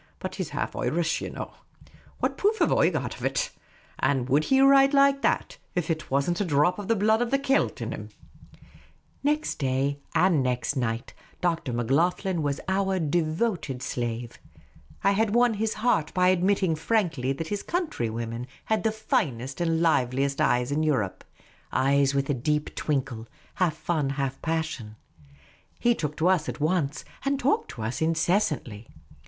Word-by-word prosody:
But - - -5
he - - -4
's - - -8
half - - -3
Otrish, 165 0 0
ye - - -4
know. - - -7 0.7
What - - 0
proof 425 +2 +1
have - - +3
I - - +4
got - - -3
of - - -10
it? - - 0 0.5
An' 130 -2 +1
would 145 +4 +2
he 265 - +3
write 275 +1 +6
like 275 0 +5
that - - 0 0.2
if 180 -3 0
there 160 -1 0
was 140 +1 +1
n't 175 +2 0
a - - +3
dhrop 165 +4 +2
of 205 - -6
the 230 - +3
blood 220 +2 +3
of 245 - 0
the 275 - +3
Celt 275 0 0
in - - -4
him? - - -6 0.6
" - - -28
Next 305 +1 -2
day 135 +1 0 0.2
and 165 -3 +4
next 125 +2 -1
night, 120 -3 -2 0.3
Dr. 165 -6 -1
Macloghlen 165 - +1
was 145 -1 -1
our 190 0 +1
devoted 160 - -1
slave. 120 -1 -4 0.6
I 200 - +4
had 215 +2 +1
won 240 -1 +4
his 220 +1 -1
heart 215 -9 +1
by 180 0 +4
admitting 185 -1 +2
frankly 160 - 0
that 160 +4 -5
his 205 -1 -2
countrywomen 120 - -3 0.2
had 220 -1 +1
the 220 - +2
finest 135 - -2
and 165 -1 +1
liveliest 135 -3 +1
eyes 125 +2 +2
in 150 +2 +1
Europe 130 -12 0 0.3
— - - -31
eyes 140 +1 +2
with 140 0 +1
a 145 - +1
deep 150 +4 -1
twinkle, 130 -6 -2 0.3
half 175 -4 +1
fun, 155 -4 -1
half 135 -1 -3
passion. 160 -9 -3 0.8
He 240 - +4
took 150 -8 -4
to 165 - +2
us 185 -4 +2
at - - -6
once, 155 -2 0 0.2
and 275 0 0
talked 280 +2 +1
to 115 - -6
us 115 +7 -3
incessantly. 160 - 0
160 Hz, 175 wpm, -26 LUFS, 135-200 Hz, 0.8 s, write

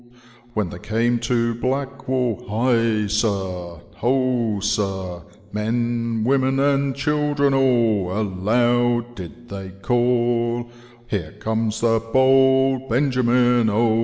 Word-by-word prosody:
" 120 0 -27
When 105 -5 -1
they 85 - -8
came 115 +3 0
to 115 0 0
Black 135 +3 -3
wall. 125 -4 -1
High 115 -1 +1
sir, 95 -5 -2 0.2
ho 125 -4 0
sir, 95 -3 -2 0.3
Men, 115 +1 -1
women, 135 +1 +2
and 140 -1 +1
children 145 -1 +1
all 115 -8 +2
Aloud 120 +5 0
did 115 +4 -11
they 95 -1 -7
call, 120 0 +1 0.2
* 120 0 -26
Hero 90 -9 -4
comes 110 0 -2
the 115 -1 +2
Bold 130 0 +3
Benjamin, 125 -2 +2
O.' 110 +1 +2
120 Hz, 115 wpm, -21 LUFS, 110-130 Hz, 0.3 s, Bold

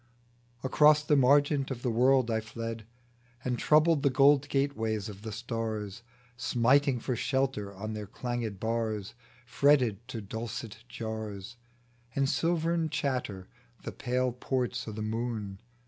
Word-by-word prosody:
Across 150 +3 +5
the 150 0 +3
margent 140 +1 +4
of 125 -3 -5
the 125 - +1
world 125 +1 +3
I 110 - +1
fled, 115 0 -6 0.6
And 125 -2 -1
troubled 155 0 +4
the 140 - +3
gold 140 +1 +4
gateways 110 -7 -1
of 100 -1 -10
the 110 0 -6
stars, 110 -2 -4 0.3
Smiting 125 +3 +2
for 125 +2 -2
shelter 130 -6 -1
on 110 +3 -5
their 105 -1 -5
changed 115 -2 -4
bars; 110 -3 -2 0.3
Fretted 125 -5 +2
to 125 -3 -5
dulcet 110 +1 -6
jars 110 -2 -6 0.6
And 140 0 +2
silvern 165 +4 +1
chatter 130 - -2 0.4
the - - -5
pale 125 0 -1
ports 125 0 -2
o* - - -4
the 110 0 -5
moon. 110 -3 -3
120 Hz, 135 wpm, -30 LUFS, 110-135 Hz, 0.6 s, Across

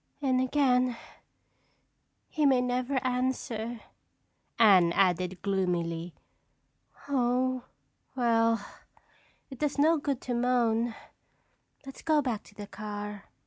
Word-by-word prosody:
"And 260 -3 +1
again, 255 -2 +2 1.3
he 305 -2 +1
may 265 -2 +4
never 250 +2 -1
answer," 245 -2 -2 0.8
Anne 190 -7 +6
added 185 -1 +1
gloomily. 175 -3 -1 0.9
"Oh, 255 -1 0 0.5
well, 230 -3 +2 0.9
it 265 - -9
does 295 -1 -1
no 315 +3 +4
good 280 -3 -2
to 250 - -3
moan. 235 -2 +1 0.9
Let's 270 - -10
go 310 -2 +2
back 245 -7 -2
to 205 - -18
the 205 - -7
car." 210 0 -7
240 Hz, 100 wpm, -29 LUFS, 205-255 Hz, 1.3 s, Anne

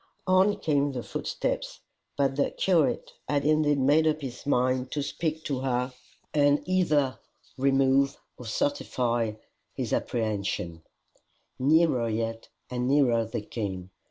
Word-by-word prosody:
On 190 +2 +4
came 145 -2 +1
the 125 - -4
footsteps, - - -3 0.4
for 140 -1 +4
the 135 +1 0
curate 170 -6 +1 0.2
had 145 -1 +1
indeed 155 -1 +3
made 145 +4 +4
up 155 0 +1
his 135 0 -7
mind 130 -1 +1
to 145 - -1
speak 160 +1 -3
to 140 -3 -2
her, 125 -1 -1 0.4
and 145 -1 +3
either 155 -8 +1 0.4
remove 135 0 +3 0.2
or 125 - -10
certify 120 -2 0 0.4
his - - -3
apprehensions. 100 -7 -2 0.8
Nearer 140 -4 +3
yet 115 +1 -3 0.2
and 125 0 -1
nearer 125 -5 +3
they 115 0 -4
came. 95 -5 -5
135 Hz, 130 wpm, -27 LUFS, 120-150 Hz, 0.8 s, On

